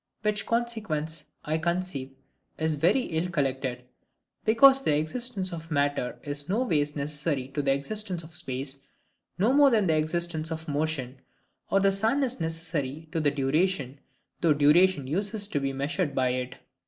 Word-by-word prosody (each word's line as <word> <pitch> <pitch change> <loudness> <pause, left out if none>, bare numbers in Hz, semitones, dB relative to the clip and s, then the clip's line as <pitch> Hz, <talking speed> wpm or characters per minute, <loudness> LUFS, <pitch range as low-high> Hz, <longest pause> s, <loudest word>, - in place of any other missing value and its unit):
Which 210 -1 0
consequence, 190 -10 -1 0.2
I 155 +1 0
conceive, 170 -6 -2 0.4
is 160 -1 +1
very 170 - +3
ill 170 -5 -2
collected, 130 -5 -1 0.6
because 265 +5 +6
the 150 - +2
existence 190 +3 -3
of 165 -1 -7
matter 145 -4 0
is 145 +1 -4
no 220 +7 +2
ways 150 - 0
necessary 145 -2 -2
to 140 +2 -2
the 140 -1 +1
existence 180 +5 -3
of 155 +1 -13
space, 135 0 -4 0.6
no 215 +8 +3
more 285 0 +7
than 220 -5 +3
the 160 -3 +3
existence 160 +1 -1
of 160 0 -5
motion, 145 -4 -2 0.5
or 195 - +3
the 195 0 +4
sun, 220 +8 +1
is 255 -8 -1
necessary 160 -2 -3
to 165 - 0
duration, 145 0 0 0.4
though 165 -3 +5
duration 150 +2 +4
uses 200 +8 -2
to 145 - 0
be 135 0 -1
measured 140 +3 -2
by 130 -1 +2
it. 125 +1 -3
160 Hz, 155 wpm, -27 LUFS, 145-190 Hz, 0.6 s, more